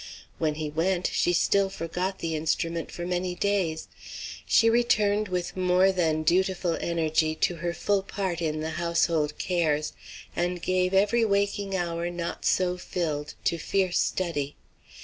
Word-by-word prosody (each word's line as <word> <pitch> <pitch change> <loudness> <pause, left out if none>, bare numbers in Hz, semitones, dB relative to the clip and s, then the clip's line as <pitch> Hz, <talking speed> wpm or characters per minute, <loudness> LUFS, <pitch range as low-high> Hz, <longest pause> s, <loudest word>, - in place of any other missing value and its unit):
When 155 -2 0
he 155 0 -3
went, 175 +4 0
she - - +2
still 195 +3 +3
forgot 185 +1 -3
the 165 -1 -2
instrument 160 +2 -1
for 175 - -6
many 180 0 -1
days. 180 -5 0 0.6
She 230 - +5
returned 215 -3 +3
with 180 -1 -3
more 185 +1 +4
than 160 -4 +1
dutiful 180 +1 +2
energy 160 -1 +1
to 170 +2 0
her 170 +1 -2
full 200 +3 0
part 190 -3 -3
in 155 -1 -1
the 160 +1 -3
household 165 -3 +1
cares, 155 -4 0 0.4
and 175 +1 -1
gave 185 +1 +1
every 210 +4 +4
waking 200 -1 0
hour 170 -1 -1
not 175 -1 -5
so 180 -1 +2
filled 155 -5 -3
to 170 - 0
fierce 185 +1 +1
study. 150 -6 -1
175 Hz, 150 wpm, -27 LUFS, 165-190 Hz, 0.6 s, She